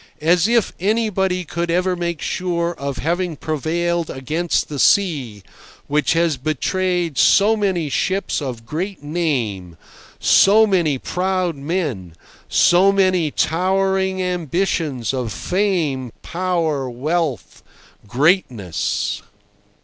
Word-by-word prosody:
As 170 +4 +3
if 235 -2 +2
anybody 190 -3 0
could 170 +2 -3
ever 180 +2 +1
make 170 -3 -3
sure 175 -2 -1
of 140 -4 -5
having 170 +2 -1
prevailed 165 +3 -2
against 155 +6 -1
the 145 -2 -6
sea, 135 - +2 0.4
which 150 +2 +1
has 165 -3 +1
betrayed 170 +3 -1
so 210 +3 +5
many 190 -7 0
ships 190 +5 -1
of 125 -5 -6
great 175 - -4
"name," 120 - -2 0.4
so 215 +3 +5
many 175 -9 +1
proud 180 +2 -1
men, 140 - -3 0.3
so 185 +3 +5
many 185 -5 +2
towering 190 +4 0
ambitions 165 - -1
of 125 -4 -3
fame, 160 - -1
power, 165 -6 -1
wealth, 150 +2 -2 0.5
greatness! 125 - 0
170 Hz, 105 wpm, -20 LUFS, 140-185 Hz, 0.5 s, so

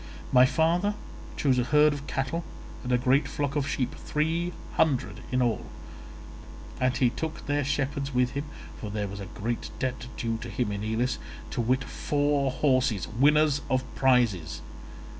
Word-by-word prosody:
My 125 0 +7
father 170 +8 +2 0.4
chose 130 -3 +3
a - - +3
herd 150 +3 +5
of 145 0 -7
cattle 140 +5 -2 0.4
and 125 - -3
a 125 - +5
great 130 +3 +3
flock 145 -1 -2
of 145 -2 0
sheep—three 160 +6 -1 0.2
hundred 125 -9 +1
in 130 0 +2
all—and 125 +2 -5
he 125 -3 +3
took 160 +4 -5
their 145 0 +1
shepherds 140 0 -1
with 125 -1 +2
him, 140 +1 -3 0.3
for 105 - -5
there 105 -1 -2
was 100 +1 -7
a 100 - -6
great 115 +5 -3
debt 125 -2 -3
due 115 -1 -1
to 120 - -6
him 115 -2 -1
in 100 0 -3
Elis, 115 +3 0 0.3
to - - -1
wit 130 +3 +1
four 145 -1 0
horses, 130 - +1
winners 145 +4 +4
of 130 0 +2
prizes. 115 - +2
130 Hz, 160 wpm, -28 LUFS, 120-145 Hz, 0.4 s, My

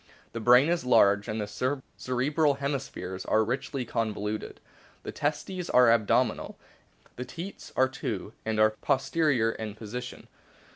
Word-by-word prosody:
The 115 - -4
brain 125 +5 +6
is 175 0 0
large, 105 -5 +4
and 110 +1 -3
the 105 - -1 0.5
cerebral 140 +4 +1
hemispheres 135 -10 -4
are 110 - +3
richly 125 +3 -3
con 115 -1 -1
voluted. 105 +1 -4 0.5
The - - -5
testes 155 +5 -3
are 125 -2 +6
abdominal. 115 -3 +1 0.6
The 125 - -4
teats 170 +10 -8
are 130 - +4
two, 110 -5 -5
and 110 -1 -1
are 110 0 +5
posterior 130 0 +1
in 110 -2 -6
position. 120 +3 -7
125 Hz, 140 wpm, -28 LUFS, 110-140 Hz, 0.6 s, brain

